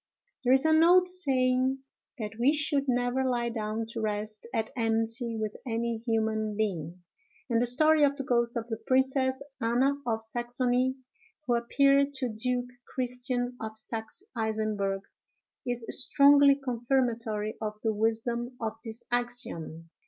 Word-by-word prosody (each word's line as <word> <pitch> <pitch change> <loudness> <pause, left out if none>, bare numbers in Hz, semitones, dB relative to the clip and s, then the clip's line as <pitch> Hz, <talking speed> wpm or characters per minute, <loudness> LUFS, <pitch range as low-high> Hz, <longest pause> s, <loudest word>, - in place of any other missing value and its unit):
There 250 0 +4
is 265 +3 +5
an 315 0 +5
old 360 +2 +6
saying, 265 -6 +1 0.3
that 215 -3 -4
we 265 +5 +4
should 290 -2 +1
never 245 +1 +1
lie 240 -2 0
down 220 -1 -3
to 230 0 -5
rest 215 0 -3
at 225 -3 -2
enmity 225 0 -1
with 215 -1 -3
any 235 -2 -2
human 220 -2 0
being; 180 -5 -3 0.5
and 230 0 +3
the 245 - +3
story 310 +5 +4
of 280 -1 +3
the 275 - -4
ghost 235 -2 +1
of 230 - -3
the 225 -2 -4
Princess 265 +1 +1 0.2
Anna 245 +5 +2
of 225 -1 0
Saxony, 245 +2 0 0.5
who 245 - +1
appeared 275 +4 +3
to 265 -2 0
Duke 245 +3 -1 0.2
Christian 250 -1 -2
of 220 0 -5
Saxe 220 - -6
Eisenburg, 215 -3 -1 0.7
is 245 -1 -2
strongly 280 +1 +6
confirmatory 235 -4 -1
of 215 -1 -3
the 220 -1 +1
wisdom 235 +3 -1
of 220 -2 -3
this 230 0 -7
axiom. 240 -10 -3
240 Hz, 145 wpm, -29 LUFS, 220-260 Hz, 0.7 s, old